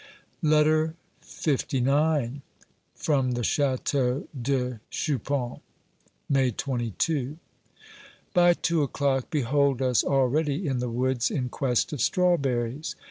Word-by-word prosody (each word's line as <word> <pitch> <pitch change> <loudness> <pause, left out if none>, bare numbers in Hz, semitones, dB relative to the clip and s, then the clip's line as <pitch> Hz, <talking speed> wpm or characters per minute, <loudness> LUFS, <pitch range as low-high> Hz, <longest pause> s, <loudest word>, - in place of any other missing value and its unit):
LETTER 155 0 +3 0.5
LIX 140 -1 +1 0.5
From 135 -4 +1
the 120 0 -2
Chateau 135 0 0
de 125 -2 -1
Chupan, 135 -2 -2 0.7
May 135 -2 +3
22. 130 - -2 1.0
By 175 -2 +5
two 170 -2 0
o'clock 140 -2 0
behold 140 -1 +1
us 130 -3 +2
already 140 +5 +1
in 135 -4 -1
the 125 0 -2
woods 125 +1 0
in 125 -4 -2
quest 125 +2 0
of 140 - -3
strawberries. 140 -6 +1
135 Hz, 100 wpm, -26 LUFS, 125-150 Hz, 1.0 s, By